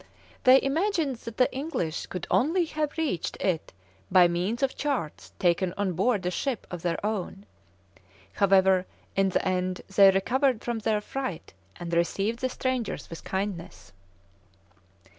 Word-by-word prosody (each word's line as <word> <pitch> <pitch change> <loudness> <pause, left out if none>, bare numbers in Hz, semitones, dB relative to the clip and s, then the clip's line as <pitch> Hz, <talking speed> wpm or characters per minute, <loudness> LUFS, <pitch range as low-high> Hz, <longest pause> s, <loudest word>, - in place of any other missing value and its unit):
They 260 +1 +8
imagined 315 - 0
that 230 0 -9
the 255 - +3
English 260 - -3
could 180 -2 -5
only 335 +7 +3
have 305 -1 -3
reached 290 - -2
it 175 -4 -1 0.4
by 180 -1 +6
means 185 +9 -1
of 270 - +1
charts 270 - -3
taken 175 0 +1
on 200 -2 0
board 195 +2 +1
a 180 - 0
ship 250 +3 -2
of 175 -2 -5
their 170 -1 -1
own. 205 -1 -3 0.9
However, 190 - +4 0.3
in 195 0 +3
the 190 - 0
end 185 0 -1
they 195 0 +8
recovered 245 +6 +1
from 235 -2 -2
their 215 -1 0
fright 255 - -5 0.2
and 170 -1 -6
received 195 +7 0
the 255 - -1
strangers 255 -7 -3
with 165 - -8
kindness. 190 -2 -5
200 Hz, 145 wpm, -27 LUFS, 180-260 Hz, 0.9 s, They